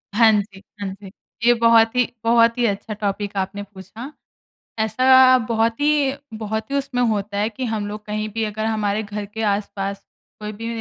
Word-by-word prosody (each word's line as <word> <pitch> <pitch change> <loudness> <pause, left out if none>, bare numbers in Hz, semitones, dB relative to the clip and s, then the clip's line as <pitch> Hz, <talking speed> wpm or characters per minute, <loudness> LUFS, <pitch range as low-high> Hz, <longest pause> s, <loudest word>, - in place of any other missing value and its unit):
हाँ 225 0 +6
जी, 200 -2 -2 0.2
हाँ 200 - -2
जी। 195 0 -10 0.3
ये 240 - +7
बहुत 230 0 +4
ही 250 -1 +3 0.2
बहुत 230 +1 +4
ही 245 - +2
अच्छा 210 0 -2
टॉपिक 205 -1 -3
आपने 195 +1 -3
पूछा। 200 - -10 0.7
ऐसा 255 +4 +5
बहुत 230 +1 0
ही 290 -2 +2 0.3
बहुत 220 +2 -4
ही 280 - 0
उसमें 270 -3 -1
होता 205 -1 -2
है 210 +1 +1
कि, 245 +4 -5
हम 220 -3 -2
लोग 210 +1 -7
कहीं 215 0 -3
भी 225 +1 -1
अगर 215 0 -3
हमारे 215 -1 0
घर 210 0 -5
के 225 - -3
आस-पास 200 -1 -2 0.4
कोई 210 0 -5
भी 225 +2 -7
220 Hz, 185 wpm, -21 LUFS, 205-230 Hz, 0.7 s, ये